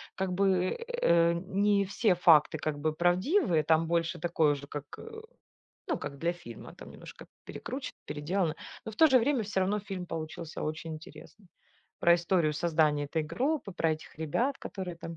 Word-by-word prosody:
как 190 -1 -2
бы, 185 -1 +1
э, 170 - +3
не 200 +3 +1
все 200 +1 +2
факты 160 -3 +5
как 150 -1 -3
бы 155 +1 0
правдивые. 175 - +2
Там 160 +1 +3
больше 170 +1 0
такое 160 -2 +2
уже 140 0 -7
как, 145 -1 -6
э, 450 -1 -9 0.7
ну, - - 0
как 140 -1 -7
для 170 +3 0
фильма, 175 -10 -11
там - - -12
немножко - - -12 0.2
перекручено, - - -6
переделано. 160 +2 -1 0.3
Но 220 - -6
в - - -14
то 320 - +7
же 260 -3 +6
время 250 0 +1
всё 195 -2 -1
равно 200 +3 +1
фильм 190 -3 -6
получился 160 0 -6
очень 155 +1 -4
интересный. 175 +5 -13 0.5
Про 170 - +6
историю 170 -2 +1
создания 155 -2 +1
этой 160 +2 -1
группы, 245 - -2
про 165 -2 +1
этих 155 - -9
ребят, 235 - -1
которые 185 -3 -6
там 165 0 -8
170 Hz, 175 wpm, -30 LUFS, 160-195 Hz, 0.7 s, то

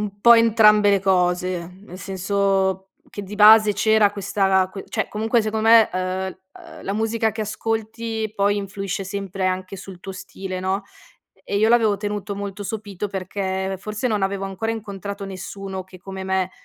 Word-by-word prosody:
un 205 -1 -5
po' 235 +3 +8
entrambe 215 -2 +5
le 200 -1 +3
cose. 180 -2 0
Nel 185 -2 -11
senso 195 0 0 0.2
che 205 - -6
di 200 +2 -8
base 215 0 +7
c'era 220 0 +4
questa 195 -2 +1
que 195 0 -8
cioè, - - -2
comunque, 225 +2 +1
secondo 220 +1 -1
me, 230 -1 +7
eh 185 +1 -2
uhm, 190 0 -13
la 195 - -3
musica 225 0 0
che 220 +1 -3
ascolti 220 0 -3
poi 205 0 +2
influisce 195 -1 -4
sempre 195 0 -4
anche 185 +1 -3
sul 190 -1 -10
tuo 195 +1 -7
stile, 190 0 -7
no, 190 +2 -1 0.6
e 200 - -1
io 220 +2 +4
l'avevo 225 -3 +4
tenuto 205 0 -4
molto 200 0 -6
sopito 205 -2 -5
perché 190 0 -3
forse 215 +5 -3
non 210 -4 -1
avevo 195 0 -1
ancora 195 +4 -3
incontrato 200 -2 -6
nessuno 190 0 -6
che, 185 0 -14
come 190 0 -7
me, 190 -1 0
200 Hz, 170 wpm, -22 LUFS, 190-215 Hz, 0.6 s, po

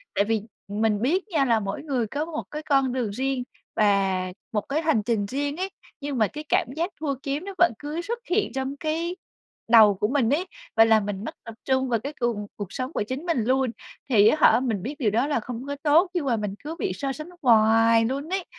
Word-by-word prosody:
tại 200 - +4
vì 220 -1 0 0.3
mình 210 0 0
biết 360 - +1
nha 305 -8 +1
là 230 -3 +3
mỗi 200 +6 -4
người 260 -7 -1
có 290 +7 -3
một 320 -2 -5
cái 300 - -4
con 270 -4 +2
đường 245 -5 -1
riêng 260 +3 -1 0.3
và 195 -3 +2 0.2
một 210 - 0
cái 300 +4 0
hành 305 -10 +2
trình 215 -2 0
riêng 285 +7 -3
ấy, 375 +2 -2 0.3
nhưng 280 -2 -3
mà 215 -2 +3
cái 300 0 -8
cảm - - +2
giác 335 +3 -1
thua 285 -3 -1
kiếm 290 +5 -3
nó 395 - -6
vẫn 350 -5 +5
cứ 300 +3 -4
xuất 470 +7 -4
hiện 405 +4 +1
trong 265 +1 -3
cái 330 +3 -2 0.5
đầu 220 -3 +8
của 210 - 0
mình 255 -2 +1
ấy 350 +6 0 0.3
và 225 0 +7
làm 220 -2 +4
mình 205 0 -4
mất - - -6
tập 230 - -9
trung 260 -1 +1
vào 230 -2 +1
cái 285 +6 -6
cùng 230 -4 -1
cuộc 205 -2 -7
sống 255 +4 -4
của - - 0
chính 260 +9 -5
mình 330 -10 +1
luôn, 260 +1 +1 0.4
thì 215 -3 +6
á 310 - +4
hả 225 -5 +6
mình 225 -8 -2
biết 280 +5 -4
điều 220 -6 +2
đó 235 +7 +1
là 295 - +1
không 245 +2 -6
có 285 - -3
tốt 325 +5 +4
nhưng 345 -5 -1
mà 250 -4 +2
mình 210 -2 -3
cứ 315 +2 -5
bị 400 - -1
so 275 -1 -3
sánh 305 +4 -8
hoài 225 -1 +5
luôn 275 +6 -3
ấy. 380 -1 -2
260 Hz, 240 wpm, -25 LUFS, 220-300 Hz, 0.5 s, đầu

